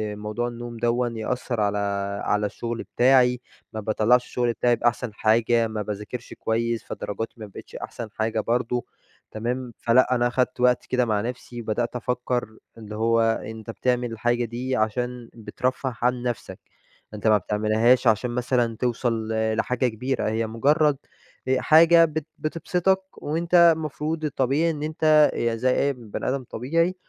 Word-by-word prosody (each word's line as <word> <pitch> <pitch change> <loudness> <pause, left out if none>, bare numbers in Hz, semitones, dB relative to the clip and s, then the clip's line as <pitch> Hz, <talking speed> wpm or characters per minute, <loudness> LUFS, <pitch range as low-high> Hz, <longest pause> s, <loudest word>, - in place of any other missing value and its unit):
موضوع 105 +3 -3
النوم 120 -1 -7
دوًّا 120 +2 +1
يأثر 120 0 -2
على 105 0 +1 0.5
على 105 0 +1
الشغل 115 +3 -4
بتاعي. 125 -1 +4 0.3
ما 110 - -4
باطلعش 110 +3 +2
الشغل 120 -1 -1
بتاعي 120 +2 +2
بأحسن 120 0 -1
حاجة. 115 +2 +2
ما 110 -1 -4
باذاكرش 105 +4 -6
كويّس، 115 +1 -1
فدرجاتي 115 +2 -5
ما 110 - -6
بقتش 100 - -12
أحسن 115 -3 -6
حاجة 110 0 -1
برضو. 120 +2 -1 0.5
تمام؟ 120 +2 -4
فلأ 125 +2 +3
أنا 120 0 +2
خدت 125 0 -1
وقت 125 0 +3
كده 125 -1 +1
مع 105 -2 0
نفسي، 120 0 -6
وبدأت 115 +2 -2
أفكّر 125 -2 -2 0.2
اللي 105 -1 -8
هو 115 +1 +2
أنت 115 0 -2
بتعمل 125 0 -1
الحاجة 120 +1 0
دي 125 +3 -3
عشان 120 +2 -2
بترفه 125 +3 -3
عن 125 0 +1
نفسك. 120 -2 -4 0.5
أنت 105 +1 -3
ما 105 -1 +6
بتعملهاش 110 +5 +2
عشان 110 +2 +2
مثلًا 120 -2 0
توصل 120 -2 -1
ل-لحاجة 110 +3 0
كبيرة. 125 +1 -2
هي 110 +1 -1
مجرّد 145 +6 +2 0.5
آآ 130 -1 +2
حاجة 165 +2 +7
بت 155 -1 -4
بتبسطك، 180 +4 0 0.2
وأنت 170 +4 -1 0.2
المفروض 155 +1 -3
الطبيعي 145 +3 +1
إن 150 -1 -5
أنت 155 -1 +4
يا 115 -1 0
زي 125 +3 +1
أي 140 0 +2
بني 115 -3 -5
آدم 130 0 -2
طبيعي 165 +11 0
120 Hz, 150 wpm, -24 LUFS, 110-130 Hz, 0.5 s, حاجة